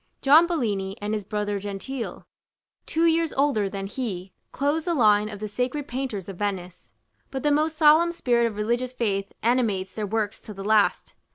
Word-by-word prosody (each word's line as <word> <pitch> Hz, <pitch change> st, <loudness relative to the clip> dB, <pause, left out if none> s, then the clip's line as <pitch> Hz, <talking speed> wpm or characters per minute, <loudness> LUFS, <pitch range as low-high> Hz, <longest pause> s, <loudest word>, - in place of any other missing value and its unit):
John 310 Hz, +5 st, +7 dB
Bellini, 205 Hz, -, -2 dB
and 205 Hz, +1 st, -3 dB
his 210 Hz, -1 st, -2 dB
brother 205 Hz, 0 st, -2 dB
Gentile, 205 Hz, +6 st, -6 dB, 0.6 s
two 330 Hz, +1 st, +1 dB
years 330 Hz, -1 st, +2 dB
older 270 Hz, -8 st, +1 dB
than 195 Hz, 0 st, -5 dB
he, 195 Hz, -4 st, -5 dB, 0.2 s
close 290 Hz, +3 st, 0 dB
the 345 Hz, -2 st, 0 dB
line 210 Hz, -4 st, +4 dB
of 205 Hz, -2 st, -8 dB
the 215 Hz, -, -4 dB
sacred 250 Hz, +6 st, -2 dB
painters 245 Hz, -7 st, -4 dB
of 195 Hz, -3 st, -7 dB
Venice. 185 Hz, -3 st, -4 dB, 0.4 s
But 265 Hz, -1 st, -5 dB
the 295 Hz, -, +3 dB
most 310 Hz, +2 st, +1 dB
solemn 315 Hz, +2 st, +6 dB
spirit 240 Hz, -8 st, +1 dB
of 220 Hz, -, -5 dB
religious 240 Hz, +4 st, -1 dB
faith 200 Hz, -5 st, -1 dB
animates 220 Hz, -6 st, +1 dB
their 215 Hz, -2 st, -3 dB
works 210 Hz, 0 st, -2 dB
to 210 Hz, -, -10 dB
the 195 Hz, 0 st, -7 dB
last. 215 Hz, -1 st, +2 dB
220 Hz, 180 wpm, -25 LUFS, 205-275 Hz, 0.6 s, John